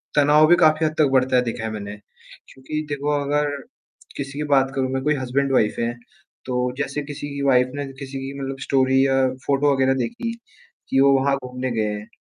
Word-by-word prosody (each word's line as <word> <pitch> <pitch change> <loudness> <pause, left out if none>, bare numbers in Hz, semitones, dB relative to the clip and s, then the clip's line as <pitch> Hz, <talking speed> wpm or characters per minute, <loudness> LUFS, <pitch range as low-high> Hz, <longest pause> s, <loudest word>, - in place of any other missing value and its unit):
तनाव 150 +1 +5
भी 175 - +6
काफ़ी 155 -2 +3
हद 155 - 0
तक 155 - +5
बढ़ता 130 0 +3
है 125 - +5
देखा 115 -1 -4
है 110 - -3
मैंने। 105 -1 -6 0.6
क्योंकि 155 +4 -5
देखो 145 0 -2
अगर 145 +1 0 0.7
किसी 140 0 -5
की - - -1
बात 135 0 +3
करूँ 130 -1 0
मैं 130 - -1
कोई 150 0 +2
हसबैंड, 135 +1 -1
वाइफ़ 105 -4 +2
है, 115 +1 -1 0.5
तो 125 -1 -1
जैसे 150 0 -2
किसी 145 0 -7
की 140 0 -5
वाइफ़ 125 -2 +4
ने 145 0 -3
किसी 135 0 -7
की 135 +1 -6
मतलब 135 0 -5
स्टोरी 135 0 +2
या 135 0 +2 0.3
फोटो 140 +1 +3
वग़ैरह 135 0 +2
देखी, 130 - -3 0.6
कि 135 - +2
वो 140 0 +6
वहाँ 140 +1 +2
घूमने 125 0 -4
गए 110 -2 0
हैं। 105 +1 -7
135 Hz, 205 wpm, -22 LUFS, 130-145 Hz, 0.7 s, भी